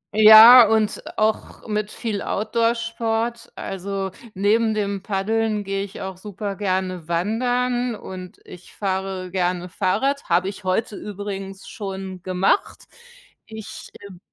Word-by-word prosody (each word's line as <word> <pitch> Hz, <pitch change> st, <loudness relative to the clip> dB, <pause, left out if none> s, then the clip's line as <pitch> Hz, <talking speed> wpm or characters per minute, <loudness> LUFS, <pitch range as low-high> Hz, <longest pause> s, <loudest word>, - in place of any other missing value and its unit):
Ja, 220 Hz, +2 st, +10 dB
und 220 Hz, -1 st, +1 dB, 0.2 s
auch 215 Hz, +1 st, -1 dB
mit 210 Hz, 0 st, -2 dB
viel 215 Hz, -4 st, -4 dB
Outdoor-Sport. 230 Hz, +1 st, -1 dB
Also, 195 Hz, 0 st, -4 dB, 0.2 s
neben 215 Hz, +3 st, +2 dB
dem 200 Hz, -2 st, -2 dB
Paddeln 210 Hz, +2 st, -1 dB
gehe 195 Hz, 0 st, -2 dB
ich 200 Hz, -, -9 dB
auch 190 Hz, -1 st, -6 dB
super 200 Hz, 0 st, -6 dB
gerne 185 Hz, -4 st, -2 dB
wandern 245 Hz, +6 st, 0 dB
und 185 Hz, -2 st, -9 dB
ich 180 Hz, -, -13 dB
fahre 190 Hz, -2 st, -3 dB
gerne 180 Hz, -1 st, -1 dB
Fahrrad, 270 Hz, +11 st, -1 dB
habe 180 Hz, +2 st, +2 dB
ich 200 Hz, -, -10 dB
heute 195 Hz, +3 st, -1 dB
übrigens 195 Hz, -1 st, -7 dB
schon 190 Hz, -2 st, -7 dB
gemacht. 185 Hz, -, 0 dB, 0.6 s
Ich, 220 Hz, -1 st, -9 dB, 0.2 s
ähm 185 Hz, -3 st, -13 dB
200 Hz, 120 wpm, -22 LUFS, 190-225 Hz, 0.6 s, Ja